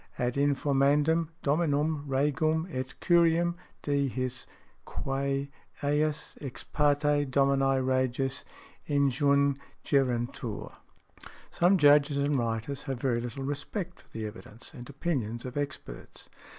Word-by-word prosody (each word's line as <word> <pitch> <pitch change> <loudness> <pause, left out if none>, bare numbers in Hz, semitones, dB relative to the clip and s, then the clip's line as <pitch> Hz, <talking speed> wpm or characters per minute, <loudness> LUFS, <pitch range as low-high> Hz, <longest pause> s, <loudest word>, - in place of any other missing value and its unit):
ad 125 -1 0
informandum 145 +3 +2
Dominum 150 0 +1
regem 150 +4 +1
et 130 0 -4
curiam 170 0 +4 0.3
de 140 -1 +1
his 130 0 -4 0.4
quæ 135 +1 -2 0.4
eis 150 +1 0
exparte 145 +1 +1
Domini 135 0 +3
Regis 130 +1 0 0.5
injungerentur_ 140 -4 0 0.4
." - - -17
Some 180 +3 +4
Judges 145 -2 +5
and 140 +1 +1
writers 115 +2 -2
have 135 -3 -2
very 120 -2 0
little 120 +3 -5
respect 165 +7 -4
for - - -27
the 110 -1 -5
evidence 105 +3 -9
and 120 -3 -10
opinions 130 -6 -2
of 125 - -6
experts. 145 - -6
140 Hz, 110 wpm, -29 LUFS, 130-145 Hz, 0.5 s, Judges